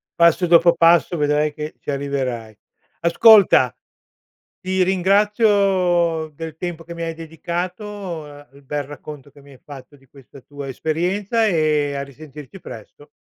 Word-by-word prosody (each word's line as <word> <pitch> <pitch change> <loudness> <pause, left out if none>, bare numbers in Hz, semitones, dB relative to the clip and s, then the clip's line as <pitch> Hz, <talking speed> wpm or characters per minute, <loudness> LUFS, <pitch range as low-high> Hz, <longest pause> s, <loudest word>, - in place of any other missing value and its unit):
Passo 170 +1 +3
dopo 170 0 +5
passo, 170 +1 +4
vedrai 150 0 +1
che 150 +1 -7
ci - - -5
arriverai. 130 -6 -4 0.5
Ascolta, 170 - +5 0.9
ti 185 0 0
ringrazio 190 -4 +2
del 160 0 -8
tempo 170 -1 -6
che 170 - -9
mi 170 - -6
hai 165 0 -4
dedicato, 175 +2 -6
a 145 0 -14
il 140 +1 -18
bel 145 +1 -4
racconto 145 0 -11
che 145 - -19
mi 140 - -17
hai 130 - -16
fatto 145 0 -13
di 135 -1 -25
questa 135 +1 -17
tua 140 +1 -9
esperienza, 180 - -1
e, 155 -6 +1
a 140 - -3
risentirci 145 +4 -12
presto. 130 +5 -12
160 Hz, 145 wpm, -20 LUFS, 145-180 Hz, 0.9 s, dopo